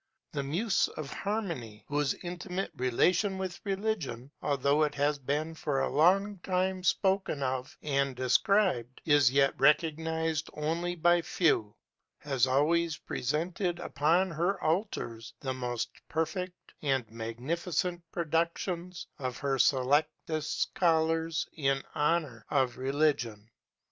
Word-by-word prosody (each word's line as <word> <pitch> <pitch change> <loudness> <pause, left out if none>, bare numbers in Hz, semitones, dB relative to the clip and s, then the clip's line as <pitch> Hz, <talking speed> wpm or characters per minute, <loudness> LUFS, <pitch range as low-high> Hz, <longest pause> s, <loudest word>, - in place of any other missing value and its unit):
The 140 - -2
Muse 175 +10 +1
of 150 -2 -5
Harmony, 170 - -4
whose 145 -1 0
intimate 180 +2 -4
relation 180 - +2
with 190 -1 -4
religion, 190 - -2
although 140 +1 +2
it 150 -1 +1
has 145 0 +1
been 150 +4 -2
for 145 -3 -1
a - - 0
long 195 +6 +3
time 185 +1 -1
spoken 190 -7 +1
of 130 0 -3
and 140 -2 0
described, 130 - +2
is 145 -5 +5
yet 140 0 +4
recognized 160 0 +2
only 165 +4 -1
by 175 +1 +4
few, 150 - +1 0.4
has 135 -4 +1
always 155 +4 +2
presented 170 - -2
upon 175 +2 +1
her 175 +4 0
altars 155 - -2
the 130 -2 -2
most 125 -2 -3 0.2
perfect 165 +3 -3
and 135 -5 0
magnificent 160 +10 -2
productions 170 +2 -2
of 130 -3 -3
her 135 -2 -1
selectest 145 +4 +1
scholars 165 -1 +1
in 135 -3 0
honor 150 -7 0
of 130 -4 +1
religion. 130 -6 0
155 Hz, 120 wpm, -30 LUFS, 135-175 Hz, 0.4 s, is